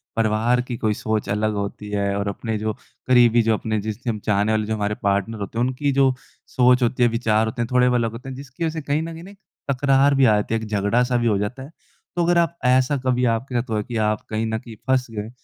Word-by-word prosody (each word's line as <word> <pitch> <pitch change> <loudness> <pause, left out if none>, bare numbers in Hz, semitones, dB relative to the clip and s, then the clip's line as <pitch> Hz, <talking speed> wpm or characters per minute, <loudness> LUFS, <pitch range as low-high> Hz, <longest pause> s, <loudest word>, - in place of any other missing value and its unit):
परिवार 115 +2 +2
की 125 -1 -5
कोई 110 -2 0
सोच 110 0 -2
अलग 105 +1 0
होती 100 +1 -5
है 100 -1 -1
और 100 - -2
अपने 110 +2 -3
जो 110 0 -2 0.3
करीबी 120 -2 +5
जो 115 -1 +2
अपने 110 0 -1
जिससे 110 +3 -4
हम 110 - -2
चाहने 105 +1 +2
वाले 110 -1 +1
जो 110 - -2
हमारे 105 0 -1
पार्टनर 100 +3 0
होते 100 +3 -6
हैं, 120 - +2
उनकी 135 +3 -1
जो 135 -1 +3 0.3
सोच 125 0 +3
होती 125 +1 +1
है 120 - +5
विचार 110 -1 +1
होते 120 +2 -4
हैं, 115 - -1
थोड़े 125 0 +4
ब 125 - +1
अलग 115 -2 +1
होते 125 +4 -9
हैं 130 - -6
जिसकी 140 +4 -8
वजह 160 - 0
से - - -6
कहीं 145 +2 -1
न 165 0 -5
कहीं 165 +1 -10
ना 195 - -11
एक 200 - -19 0.3
तकरार 135 +1 +3
भी 135 - +4
आ 110 -3 +5
जाती 105 +2 -1
है, 115 - 0
एक 110 - -6
झगड़ा-सा 115 +5 +1
भी 120 - +1
हो 105 -3 +2
जाता 120 +7 -4
है। 145 - -11 0.4
तो 175 - +1
अगर 175 0 +3
आप 170 0 +1
ऐसा 130 +3 +3
कभी 125 -1 +2
आपके 125 +3 -4
साथ 120 +1 -1
हुआ 110 - 0
है 105 - -1
कि 115 +1 -5
आप 105 -1 0
कहीं 110 +1 -1
न 110 0 -1
कहीं 115 -3 -11
फँस 130 -1 +2
गए 110 0 -5
115 Hz, 270 wpm, -22 LUFS, 110-130 Hz, 0.4 s, करीबी